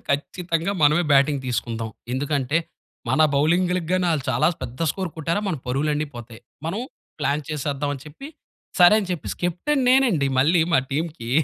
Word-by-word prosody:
ఖచ్చితంగా 170 Hz, +5 st, -1 dB
మనమే 150 Hz, +4 st, +5 dB
బ్యాటింగ్ 140 Hz, 0 st, +4 dB
తీసుకుందాం. 115 Hz, -2 st, -3 dB, 0.2 s
ఎందుకంటే 140 Hz, +2 st, 0 dB, 0.5 s
మన -, -, +2 dB
బౌలింగ్‌‌లగాని 180 Hz, +3 st, +1 dB
ఆళ్ళు 150 Hz, -5 st, -1 dB
చాలా 130 Hz, +5 st, +2 dB, 0.2 s
పెద్ద 125 Hz, +4 st, -7 dB
స్కోర్ 185 Hz, -4 st, -4 dB
కొట్టారా 165 Hz, +5 st, -1 dB
మన 170 Hz, -, -1 dB
పరువులన్ని 150 Hz, +4 st, 0 dB
పోతాయి. 120 Hz, -1 st, -10 dB, 0.3 s
మనం 195 Hz, +7 st, -2 dB, 0.4 s
ప్లాన్ 150 Hz, 0 st, 0 dB
చేసేద్దాం 145 Hz, -1 st, -2 dB
అని 135 Hz, -, -10 dB
చెప్పి 160 Hz, -, -10 dB, 0.5 s
సరే 175 Hz, +3 st, +8 dB
అని 195 Hz, -, -5 dB
చెప్పేసి 170 Hz, -, -5 dB
కెప్టెన్ 260 Hz, -, 0 dB
నేనండి 240 Hz, -, +3 dB
మళ్ళీ 165 Hz, +5 st, +4 dB
మా 130 Hz, -, +5 dB
టీమ్‌కి. 150 Hz, -5 st, -3 dB
155 Hz, 145 wpm, -23 LUFS, 140-175 Hz, 0.5 s, సరే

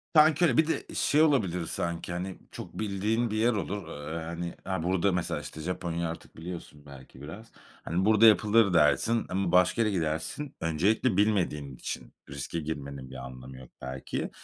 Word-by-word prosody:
Sanki 155 Hz, +2 st, +6 dB
öyle, -, -, +2 dB
bir 160 Hz, -1 st, +5 dB
de 165 Hz, -, -1 dB
şey 150 Hz, -, +3 dB
olabilir 100 Hz, -, +2 dB
sanki, 85 Hz, +1 st, -3 dB
hani, 90 Hz, +1 st, -4 dB
çok -, -, -8 dB
bildiğin 110 Hz, +3 st, 0 dB
bir 110 Hz, -, -1 dB
yer 120 Hz, +2 st, +3 dB
olur, 100 Hz, -3 st, -3 dB
aaa, 80 Hz, +1 st, -6 dB
hani, 85 Hz, +1 st, -4 dB
a 95 Hz, -4 st, -2 dB
burada 95 Hz, +2 st, +2 dB
mesela, 90 Hz, -1 st, -1 dB
işte, 80 Hz, -, -8 dB
Japonya 85 Hz, -1 st, -2 dB
artık 80 Hz, -, -9 dB
biliyorsun 80 Hz, -4 st, -8 dB
belki 70 Hz, -2 st, -13 dB
biraz. 90 Hz, +10 st, -9 dB, 0.3 s
Hani, 90 Hz, +3 st, 0 dB
"Burada 110 Hz, +1 st, +6 dB
yapılır." 110 Hz, -1 st, +5 dB
dersin 90 Hz, +9 st, +3 dB
ama 95 Hz, -1 st, 0 dB
başka 90 Hz, +6 st, +4 dB
yere 110 Hz, -2 st, +2 dB
gidersin. 85 Hz, -, -2 dB
Öncelikle 95 Hz, +7 st, +2 dB
bilmediğin 85 Hz, -10 st, +1 dB
için -, -, -6 dB, 0.2 s
riske 85 Hz, -, -4 dB
girmenin 70 Hz, -4 st, -5 dB
bir -, -, -9 dB
anlamı 65 Hz, 0 st, -9 dB
yok 65 Hz, -1 st, -12 dB
belki. 65 Hz, 0 st, -4 dB
90 Hz, 170 wpm, -29 LUFS, 80-110 Hz, 0.3 s, Sanki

